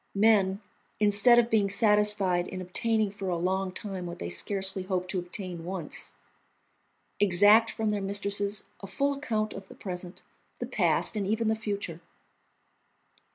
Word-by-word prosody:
Men, 200 Hz, -2 st, +3 dB, 0.4 s
instead 210 Hz, +3 st, +5 dB
of 240 Hz, 0 st, +3 dB
being 210 Hz, -3 st, +2 dB
satisfied 210 Hz, -4 st, +2 dB
in 185 Hz, -, -6 dB
obtaining 215 Hz, +3 st, 0 dB
for 195 Hz, -2 st, -5 dB
a 175 Hz, -, -1 dB
long 185 Hz, +2 st, -1 dB
time 185 Hz, -2 st, -5 dB
what 170 Hz, -, -7 dB
they 85 Hz, -, -5 dB
scarcely 190 Hz, -, 0 dB
hoped 185 Hz, -1 st, -3 dB
to 190 Hz, -, -1 dB
obtain 180 Hz, -2 st, -6 dB
once, 175 Hz, -3 st, -5 dB, 1.0 s
exact 205 Hz, +4 st, +5 dB
from 220 Hz, -1 st, -2 dB
their 205 Hz, -1 st, -2 dB
mistresses 200 Hz, +1 st, -1 dB, 0.2 s
a 195 Hz, -, -9 dB
full 280 Hz, +7 st, 0 dB
account 220 Hz, -7 st, -2 dB
of 195 Hz, 0 st, -9 dB
the -, -, -13 dB
present, 180 Hz, -2 st, -7 dB, 0.3 s
the -, -, -4 dB
past, -, -, +1 dB
and 200 Hz, -2 st, -2 dB
even 220 Hz, +2 st, 0 dB
the 220 Hz, -, +2 dB
future. 200 Hz, -6 st, -5 dB
200 Hz, 155 wpm, -28 LUFS, 185-215 Hz, 1.0 s, instead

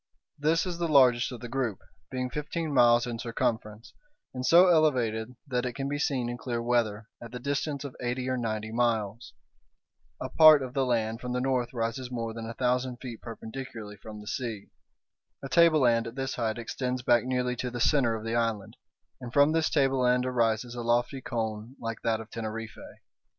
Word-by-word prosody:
This 160 Hz, +4 st, +2 dB
is 175 Hz, -2 st, -4 dB
the 170 Hz, -, 0 dB
largest 130 Hz, -5 st, +4 dB
of 125 Hz, -, -8 dB
the 120 Hz, -, -6 dB
group, 120 Hz, -5 st, -2 dB, 0.3 s
being 125 Hz, -1 st, -3 dB
fifteen 150 Hz, +2 st, -3 dB
miles 120 Hz, -2 st, +5 dB
in 120 Hz, -2 st, -5 dB
circumference, 110 Hz, -1 st, -3 dB, 0.4 s
and 125 Hz, -1 st, -4 dB
so 170 Hz, +7 st, +7 dB
elevated 125 Hz, -8 st, +2 dB
that 125 Hz, -4 st, -1 dB
it 125 Hz, -1 st, -3 dB
can 135 Hz, +2 st, -3 dB
be 145 Hz, +1 st, -2 dB
seen 130 Hz, -4 st, 0 dB
in 120 Hz, 0 st, -5 dB
clear 120 Hz, -2 st, -3 dB
weather 115 Hz, -3 st, 0 dB
at 120 Hz, -, -9 dB
the 125 Hz, -, -6 dB
distance 140 Hz, +2 st, -2 dB
of 140 Hz, -3 st, -7 dB
eighty 125 Hz, +1 st, -2 dB
or 130 Hz, -, 0 dB
ninety 110 Hz, -3 st, -3 dB
miles. 115 Hz, -1 st, -1 dB, 0.9 s
A -, -, -3 dB
part 155 Hz, -3 st, +7 dB
of 130 Hz, -1 st, -6 dB
the 135 Hz, -2 st, +1 dB
land 115 Hz, -2 st, 0 dB
toward 125 Hz, 0 st, -4 dB
the 125 Hz, -, 0 dB
north 125 Hz, -2 st, 0 dB
rises 120 Hz, +2 st, -3 dB
more 115 Hz, -2 st, -4 dB
than 115 Hz, 0 st, -6 dB
a 115 Hz, -, -7 dB
thousand 125 Hz, 0 st, 0 dB
feet 120 Hz, -3 st, -8 dB
perpendicularly 110 Hz, -2 st, -8 dB
from 105 Hz, 0 st, -10 dB
the 105 Hz, -, -13 dB
sea. 110 Hz, -3 st, -4 dB, 0.7 s
A 135 Hz, -, -5 dB
tableland 135 Hz, -9 st, +4 dB
at 115 Hz, -, -8 dB
this 135 Hz, -1 st, -3 dB
height 115 Hz, -2 st, -2 dB
extends 125 Hz, +2 st, -3 dB
back 120 Hz, -2 st, +4 dB
nearly 125 Hz, -1 st, -1 dB
to 125 Hz, -, -3 dB
the 120 Hz, 0 st, -6 dB
centre 125 Hz, -3 st, +3 dB
of 110 Hz, -, -6 dB
the 115 Hz, -, -2 dB
island, 115 Hz, -4 st, -1 dB, 0.4 s
and 120 Hz, -2 st, -7 dB
from 145 Hz, +3 st, +5 dB
this 160 Hz, 0 st, +2 dB
tableland 130 Hz, -3 st, +2 dB
arises 120 Hz, -1 st, 0 dB
a 120 Hz, -, -5 dB
lofty 120 Hz, +3 st, 0 dB
cone 110 Hz, 0 st, -4 dB
like 115 Hz, -1 st, -5 dB
that 115 Hz, -1 st, 0 dB
of 110 Hz, 0 st, -10 dB
Teneriffe. 115 Hz, 0 st, -7 dB
125 Hz, 190 wpm, -28 LUFS, 115-130 Hz, 0.9 s, so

